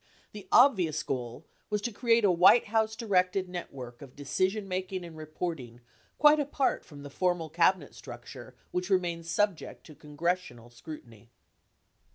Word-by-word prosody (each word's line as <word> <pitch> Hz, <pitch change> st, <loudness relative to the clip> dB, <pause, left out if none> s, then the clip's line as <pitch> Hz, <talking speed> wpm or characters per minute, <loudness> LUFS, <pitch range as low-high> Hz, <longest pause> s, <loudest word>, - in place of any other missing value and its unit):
The 205 Hz, -2 st, -11 dB
obvious 185 Hz, -, +4 dB
goal 120 Hz, -3 st, -5 dB, 0.2 s
was 210 Hz, -1 st, 0 dB
to 240 Hz, -, -2 dB
create 230 Hz, 0 st, +2 dB
a 195 Hz, -, +5 dB
White 180 Hz, +7 st, +6 dB
House 220 Hz, 0 st, 0 dB
directed 190 Hz, -4 st, +1 dB
net 180 Hz, -1 st, -6 dB
work 125 Hz, -3 st, -10 dB
of 135 Hz, -3 st, -12 dB
decisionmaking 185 Hz, +4 st, -2 dB
and 165 Hz, -2 st, -11 dB
reporting 155 Hz, -6 st, -6 dB, 0.4 s
quite 300 Hz, 0 st, +6 dB
apart 280 Hz, -2 st, 0 dB
from 145 Hz, -3 st, -13 dB
the 145 Hz, -, -9 dB
formal 175 Hz, -2 st, -1 dB
Cabinet 170 Hz, -1 st, +2 dB
structure -, -, -11 dB, 0.2 s
which 180 Hz, +1 st, -3 dB
remained 175 Hz, -3 st, 0 dB
subject 205 Hz, 0 st, -1 dB
to 155 Hz, -, -12 dB
congressional 150 Hz, -5 st, -4 dB
scrutiny. 120 Hz, -4 st, -12 dB
180 Hz, 145 wpm, -29 LUFS, 145-200 Hz, 0.4 s, White